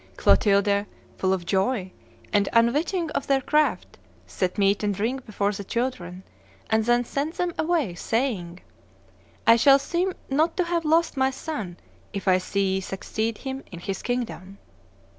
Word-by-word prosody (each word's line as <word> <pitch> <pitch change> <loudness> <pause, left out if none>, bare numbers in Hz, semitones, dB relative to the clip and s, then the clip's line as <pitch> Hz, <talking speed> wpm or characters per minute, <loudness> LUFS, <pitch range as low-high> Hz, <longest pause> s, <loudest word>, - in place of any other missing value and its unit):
Clotilde, 200 0 +3 0.3
full 185 - +1
of 185 -2 -1
joy, 190 +1 0 0.4
and 205 -2 +3
unwitting 300 +9 +2
of - - -3
their 275 -1 +3
craft, 300 +3 0 0.3
set 185 +1 -2
meat 200 0 +2
and 205 -1 0
drink 245 +6 -2
before 205 -1 0
the 200 0 -6
children, 190 -6 -3 0.5
and 220 0 +3
then 240 +1 +3
sent 290 +6 -3
them 355 -1 -1
away, 315 - +1
saying, 185 -4 -2 0.8
'I 230 - +8
shall 275 +3 +7
seem 350 +6 -1
not 310 +5 +1
to 360 - +3
have 340 -1 -1
lost 320 -1 +2
my 265 0 +3
son 260 - -5 0.4
if 200 -1 -5
I 185 -1 +5
see 195 +1 0
ye 190 - 0
succeed 220 +4 -3
him 270 0 -6
in 175 - -8
his 190 +2 -4
kingdom. 225 -6 -4
230 Hz, 160 wpm, -25 LUFS, 195-275 Hz, 0.8 s, I